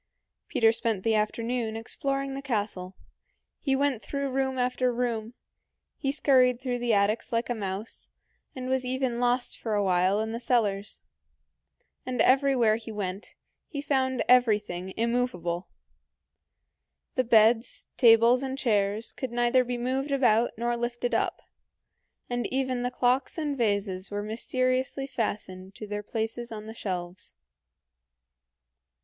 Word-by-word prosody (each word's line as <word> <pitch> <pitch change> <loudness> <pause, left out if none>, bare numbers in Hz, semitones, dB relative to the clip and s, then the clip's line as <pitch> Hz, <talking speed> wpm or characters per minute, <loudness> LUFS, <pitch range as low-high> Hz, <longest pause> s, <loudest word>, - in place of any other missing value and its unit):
Peter 225 -5 +4
spent 225 -4 -1
the 225 - +2
afternoon 225 +2 -1
exploring 275 +4 -2
the 275 - -5
castle. 205 -7 -3 0.6
He 270 -3 +1
went 275 -4 +1
through 280 +4 -3
room 265 0 0
after 250 0 +1
room; 235 -1 -2 0.6
he 270 - -1
scurried 255 -4 +4
through 250 -2 -2
the 240 -1 0
attics 210 +2 +1
like 235 +1 0
a - - +2
mouse, 205 0 -5 0.5
and 255 -1 -5
was 260 0 +1
even 255 -1 -1
lost 245 +1 +1
for 220 -2 -2
a 205 - +2
while 185 +1 +2
in 220 +1 -2
the 230 - -4
cellars. 210 -5 0 1.0
And 255 -2 -4
everywhere 255 -3 +4
he 225 0 -8
went, 200 -1 -5 0.3
he 290 - -5
found 265 -3 0
everything 210 -7 +3
immovable. 220 -7 -1 1.5
The 255 - +1
beds, 225 0 +3
tables, 235 +1 +6
and 265 0 -3
chairs 210 -3 0
could 260 -3 -5
neither 240 +1 +3
be 245 0 -3
moved 260 +4 -2
about 240 -4 +3
nor 240 +1 0
lifted 240 +1 -2
up, - - 0 0.8
and 245 0 -2
even 260 -2 -1
the 245 - 0
clocks 255 +3 +1
and 300 -3 -1
vases 200 -5 -1
were 205 0 -3
mysteriously 255 +4 -1
fastened 200 -7 -4
to 215 - -7
their 205 0 -4
places 225 +2 -4
on 215 -1 -7
the 220 - -7
shelves. 180 -4 -5
235 Hz, 140 wpm, -27 LUFS, 215-255 Hz, 1.5 s, tables